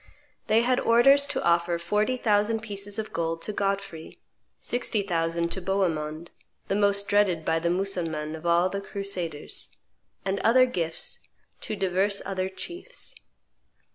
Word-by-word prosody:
They 220 +1 +4
had 255 +1 +2
orders 275 +5 +5
to - - -2
offer 170 0 +2
forty 210 +8 0
thousand 215 -1 +2
pieces 205 -1 -2
of 220 -1 -4
gold 165 0 -2
to 210 - -2
Godfrey, 195 -5 -3 0.4
sixty 235 -4 -1
thousand 170 -2 -1
to 190 - -3
Bohemond, 170 -4 -1 0.4
the 195 - +1
most 200 -1 +3
dreaded 195 -6 +2
by 165 - +2
the 170 +1 0
Mussulmans 170 -5 -2
of 160 +2 -6
all 170 +1 +4
the 200 +1 -4
crusaders, 195 -7 -4 0.5
and 195 +1 0
other 255 +5 +5
gifts 170 -10 -3 0.4
to 215 - -3
divers 195 +1 +1
other 190 -1 -2
chiefs. 350 - -8
195 Hz, 140 wpm, -26 LUFS, 170-210 Hz, 0.5 s, orders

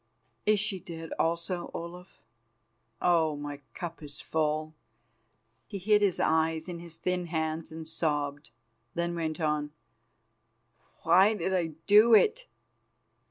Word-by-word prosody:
"Is 215 -1 +4
she 205 -2 -1
dead 165 -2 -8
also, 170 +2 -1
Olaf? 175 +2 -9 0.8
Oh! 160 -3 +3
my 145 0 -6 0.2
cup 170 -2 -6
is 145 -1 -9
full." 155 0 -1 0.9
He 200 - -5
hid 210 +2 +3
his 200 -4 +2
eyes 160 0 +1
in 175 -2 -5
his 170 -1 -9
thin 180 +1 -1
hands 160 -1 -2
and 160 0 -8
sobbed, 150 -2 -2 0.5
then 170 0 -1
went 160 -2 -3
on: 150 -2 0 1.3
"Why 190 +6 +5
did 190 -1 -1
I 165 -4 0
do 215 +3 +7
it? 455 - +3
170 Hz, 125 wpm, -29 LUFS, 155-180 Hz, 1.3 s, do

